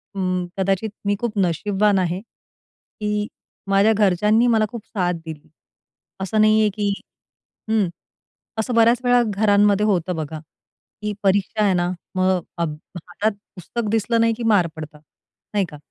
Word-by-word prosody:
अं, 185 -1 -1
कदाचित 195 +3 0 0.2
मी 205 0 +2
खूप 235 -3 -2
नशीबवान 195 +3 +2
आहे 180 0 -1
की 210 -2 -7 0.4
माझ्या 200 +3 +4
घरच्यांनी 210 +4 +3
मला 220 -2 +3
खूप 235 -4 -8
साथ 180 -4 -1
दिली. 155 -2 -9 0.7
असं 215 +3 +1
नाहीये 215 0 +4
की 205 -1 0 0.8
हं, 215 -4 +2 0.7
असं 240 +3 -1
बऱ्याचवेळा 245 +2 +4
घरांमध्ये 205 0 +3
होतं 180 -3 0
बघा, 155 0 -5 0.6
की 210 0 -2
परीक्षा 200 +2 +2
आहे 195 -2 +3
ना, 175 0 0 0.2
मग 185 0 +2 0.2
अभ 160 -3 -1 0.2
हातात 180 +5 -2 0.2
पुस्तक 210 +5 -4
दिसलं 225 +1 +1
नाही 230 0 +3
की 240 - -5
मार 180 -4 +4
पडतात, 150 -1 -9 0.5
नाही 200 -2 +2
का? 150 - -10
205 Hz, 140 wpm, -22 LUFS, 180-215 Hz, 0.8 s, माझ्या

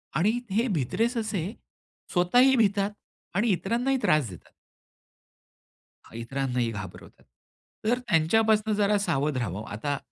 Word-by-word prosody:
आणि 210 - +2
हे 225 +6 +1
भित्रे 150 - 0
ससे 220 -7 -2 0.7
स्वतःही 245 +10 +4
भितात 200 -3 +2 0.4
आणि 210 +5 +2
इतरांनाही 240 +9 0
त्रास 155 -6 +2
देतात. 90 - -13 1.6
इतरांनाही 125 0 -2
घाबरवतात. 95 -4 -9 0.6
तर 240 +3 +2
त्यांच्यापासून 220 +2 +2
जरा 205 0 +2
सावध 150 -7 0
राहावं. 105 -4 -3
आता 140 +8 -2
195 Hz, 105 wpm, -27 LUFS, 135-225 Hz, 1.6 s, स्वतःही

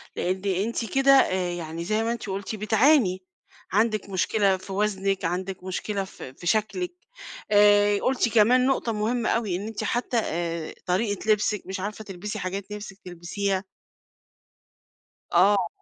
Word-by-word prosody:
لإن 190 +1 -1
أنتِ 235 0 -2
كده 270 0 +5
آآ، 185 -9 +3
يعني 165 -1 -5
زي 215 +4 0
ما 230 - 0
أنتِ 235 -2 -5
قلتِ 195 +2 -4
بتعاني، 215 -2 +3 0.5
عندٍك 215 0 +1
مشكلة 195 +1 +2
في 190 +1 -9
وزنِك 195 -2 0
عندِك 180 +2 -3
مشكلة 195 +2 -3
في 160 -8 -10
في 175 - -9
شكلِك 220 - 0 0.6
آآ، 205 0 +5
قلتِ 255 -2 +1
كمان 240 +3 +4
نقطة 265 -3 0
مهمة 225 +3 0
أوي 215 -6 0
إن 200 +4 -4
أنتِ 220 -1 -5
حتى 240 +2 -1
آآ، 165 -1 -3
طريقة 205 +3 0
لبسِك 210 -1 +1
مش 190 0 -5
عارفة 210 +3 -5
تلبسي 200 +1 -6
حاجات 195 +2 -5
نفسِك 205 -2 -7
تلبسيها. 185 +2 -2 1.7
آه. 190 +1 +4
205 Hz, 145 wpm, -25 LUFS, 185-220 Hz, 1.7 s, كده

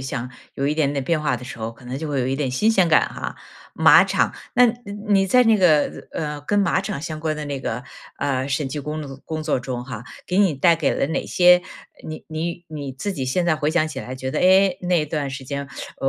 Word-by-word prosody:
象 125 -2 -4 0.2
有 140 - -1
一 150 - +1
点 150 -3 +1
点 135 -2 -2
变 165 0 +1
化 135 -5 0
的 125 - -9
时 115 - -8
候， 110 +1 -3
可 120 +2 -17
能 130 +2 -5
就 160 -1 -4
会 140 -3 0
有 125 - 0
一 135 - 0
点 135 -2 -1
新 210 - +2
鲜 190 -6 +3
感 160 - +4
哈。 - - -6 0.4
马 - - +7
场， - - +1 0.2
那 250 +1 +7
你 230 - +4 0.4
你 195 -1 +4
在 250 +6 +5
那 225 -3 +4
个， 155 -6 +2
呃， 150 -2 -4
跟 205 +8 0
马 195 -3 +2
场 140 - -4
相 155 -2 -5
关 155 -1 -1
的 150 - -5
那 140 -2 -4
个， 125 0 -4 0.3
呃， 135 -1 -1
审 135 +1 -1
计 145 +2 -4
工 150 +1 -5
作 135 -1 -9
工 155 -1 -4
作 150 -5 0
中 125 -1 -5
哈， 120 -3 -7 0.2
给 180 +2 0
你 190 -7 +4
带 170 +5 +4
给 155 -4 0
了 - - 0
哪 - - -2
些， 180 0 +6 0.5
你 155 0 -7
你 170 +2 -4
你 145 -4 -6
自 195 +10 -4
己 130 -6 -4
现 175 +7 0
在 170 -2 +3
回 150 0 0
想 160 -1 +2
起 145 -4 -6
来 130 0 -7
觉 130 0 -4
得， - - -2
哎， 190 0 +5
那 175 -3 +1
段 150 -2 -3
时 135 0 -7
间， 140 +1 -5 0.3
呃， 135 - +1
150 Hz, 270 characters per minute, -22 LUFS, 135-170 Hz, 0.5 s, 马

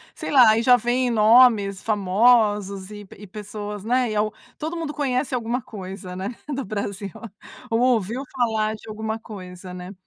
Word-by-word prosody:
Sei - - -5
lá, 255 -5 +7
aí 225 +2 +3
já 250 0 +7
vem 245 +1 0
nomes 220 -3 +5
famosos 205 -1 +2
e 205 -1 -9
pe - - -15
e 205 - -11
pessoas, 210 0 -7
né, 250 +1 +1
e 215 - -3
al 210 0 0 0.2
Todo 320 +3 -4
mundo 325 -3 -3
conhece 270 -2 -1
alguma 240 +2 -2
coisa, 190 -3 -8
né, 195 +6 -5 0.2
do 275 -1 -3
Brasil. 200 -1 -4 0.6
Ou 225 - +1
ouviu 240 0 +1
falar 220 -3 0
de 220 - -13
alguma 220 +1 -4
coisa, 185 -4 -10
né? 180 +1 -8
215 Hz, 175 wpm, -23 LUFS, 200-245 Hz, 0.6 s, lá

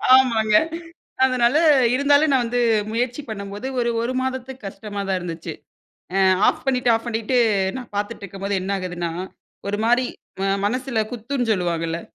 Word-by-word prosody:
ஆமாங்க 225 -5 +3 0.7
அதனால 255 0 +3 0.4
இருந்தாலும் 285 +3 +4
நான் 260 -2 +3
வந்து 245 +1 -1 0.3
முயற்சி 245 +4 -1
பண்ணும்போது 200 +1 -6
ஒரு 240 -1 +1
ஒரு 240 +2 -1
மாதத்துக்கு 260 -1 -4
கஷ்டமா 205 +1 -6
தான் 190 - +1
இருந்துச்சு. 165 -2 -6 0.6
அ - - +2 0.3
ஆஃப் - - 0
பண்ணிட்டு 250 -2 +2
ஆஃப் 225 +2 -2
பண்ணிட்டு 230 +2 0 0.4
நான் 250 -4 -9
பாத்துட்ருக்கும்போது 200 -2 -4
என்ன 190 - -4
ஆகுதுன்னா? 180 -2 -4 0.6
ஒரு 205 - -1
மாரி 245 +2 +3 0.6
மனசுல 250 +2 0
குத்துன்னு 245 +1 -2
சொல்லுவாங்கல்ல! 170 -3 -1
230 Hz, 135 wpm, -22 LUFS, 200-255 Hz, 0.7 s, இருந்தாலும்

